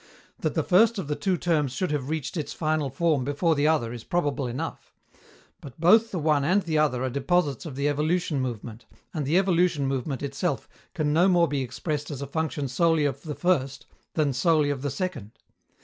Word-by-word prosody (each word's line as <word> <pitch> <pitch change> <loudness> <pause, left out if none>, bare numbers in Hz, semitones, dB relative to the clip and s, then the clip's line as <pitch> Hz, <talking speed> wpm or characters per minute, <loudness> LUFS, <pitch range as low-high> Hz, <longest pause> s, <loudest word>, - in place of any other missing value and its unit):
That - - -2
the - - +1
first 220 +5 +4
of 190 - -4
the 150 - -1
two 185 +1 0
terms 150 -7 0
should 180 +4 -2
have 140 -2 -2
reached 155 -1 -3
its 155 -4 -3
final 155 -3 -1
form 150 0 +1
before 145 +5 +1
the 145 0 +2
other 145 -8 +1
is 120 -2 -8
probable 145 -6 -1
enough; 120 +2 -6 0.7
but 135 -1 -11
both 220 +7 +5
the 190 - -4
one 150 -3 +2
and 185 +7 +2
the 155 -3 0
other 130 -5 +1
are 130 - 0
deposits 140 +1 0
of 140 - -7
the 140 +2 0
evolution 155 0 0
movement, 120 -2 -6 0.3
and 150 -4 -2
the 160 +5 +3
evolution 175 -6 +2
movement 135 0 -2
itself 140 +6 -2 0.3
can 150 -3 0
no 175 +4 +4
more 175 -3 +4
be 145 -2 -1
expressed 145 +4 -4
as 145 -4 -5
a - - -3
function 150 0 -2
solely 160 +3 +2
of 140 - -2
the 150 -2 -6
first 135 -8 0 0.3
than 150 -4 +1
solely 150 +2 +2
of 135 -2 -4
the 145 - -2
second. 140 - -4
150 Hz, 205 wpm, -26 LUFS, 135-170 Hz, 0.7 s, both